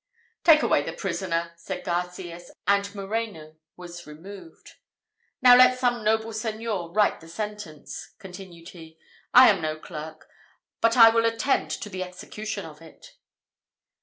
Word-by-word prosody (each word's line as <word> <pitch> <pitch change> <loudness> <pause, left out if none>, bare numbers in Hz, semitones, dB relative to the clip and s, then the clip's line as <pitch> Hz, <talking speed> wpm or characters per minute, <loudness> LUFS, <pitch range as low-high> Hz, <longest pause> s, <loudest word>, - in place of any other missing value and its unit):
"Take 310 -2 +6
away - - +3
the - - -5
prisoner," 170 -3 -3
said 180 +2 -7
Garcias, 175 0 -4 0.2
and 200 0 +1
Moreno 195 -6 -5 0.2
was 175 -1 -10
removed. 195 - -13 0.7
"Now 250 -1 +9
let 255 0 +6
some 245 -2 0
noble 220 +1 +1
Señor 215 -5 -4
write 210 -1 +2
the 165 - -15
sentence," 210 -4 -7
continued 180 -3 -11
he: 160 -3 -14 0.3
"I 255 +1 +9
am 195 - -2
no 155 0 -3
clerk, 155 0 -9 0.5
but 230 +2 +3
I 230 -1 +10
will 230 0 +2
attend 230 +4 0
to - - -5
the 190 -2 -6
execution 200 +3 -6
of 155 -1 -12
it." 165 -1 -16
195 Hz, 140 wpm, -25 LUFS, 170-220 Hz, 0.7 s, I